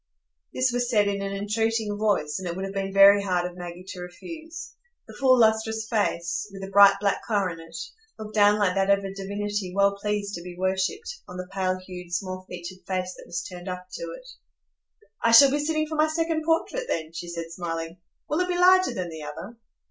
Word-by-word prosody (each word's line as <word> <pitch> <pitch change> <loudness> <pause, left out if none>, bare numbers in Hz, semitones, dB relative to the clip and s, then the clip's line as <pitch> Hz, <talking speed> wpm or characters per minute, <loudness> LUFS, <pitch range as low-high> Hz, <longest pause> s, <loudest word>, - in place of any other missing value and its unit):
This 255 0 +1
was 245 0 -1
said 210 -3 +3
in 200 0 -1
an 195 0 -3
entreating 210 +1 -1
voice, 200 -8 0
and 185 - -5
it 170 - -3
would 190 +1 -3
have 195 - -6
been 195 -1 -2
very 200 +1 +7
hard 180 -3 0
of 180 0 -6
Maggie 175 0 -8
to 180 - -7
refuse. 320 - -9 0.3
The - - -11
full, 260 -1 +4
lustrous 220 -1 +2
face, 205 -4 -1
with 195 0 -9
the 195 - -7
bright 200 0 +8
black 200 -1 0
coronet, 170 -6 -2 0.4
looked 215 -1 -8
down 205 -1 +5
like 200 -3 +2
that 195 0 +1
of 200 0 +4
a 195 - -5
divinity 200 0 -3
well 200 0 +3
pleased 210 -1 -2
to 170 - -5
be 175 0 -9
worshipped, 190 - -1
on 180 - -9
the 185 - -5
pale 185 -1 0
hued, 180 -1 -10
small 185 +1 -4
featured 180 +1 -8
face 185 -1 -2
that - - -13
was 175 +1 -3
turned 180 0 -8
up 180 0 -6
to - - -6 0.2
it. - - -17 1.0
"I 230 - +4
shall 270 +4 +9
be 290 +1 0
sitting 310 0 0
for 310 - -7
my 310 +1 +4
second 320 0 -1
portrait 330 +10 0
then," 160 0 -3
she 175 - -6
said, 170 -1 -6
smiling. 165 -1 -5 0.3
"Will 305 - 0
it 360 - +1
be 355 -1 -1
larger 370 +1 +5
than 180 -2 -3
the 160 -1 -8
other?" 150 +9 -8
200 Hz, 215 wpm, -26 LUFS, 180-225 Hz, 1.0 s, shall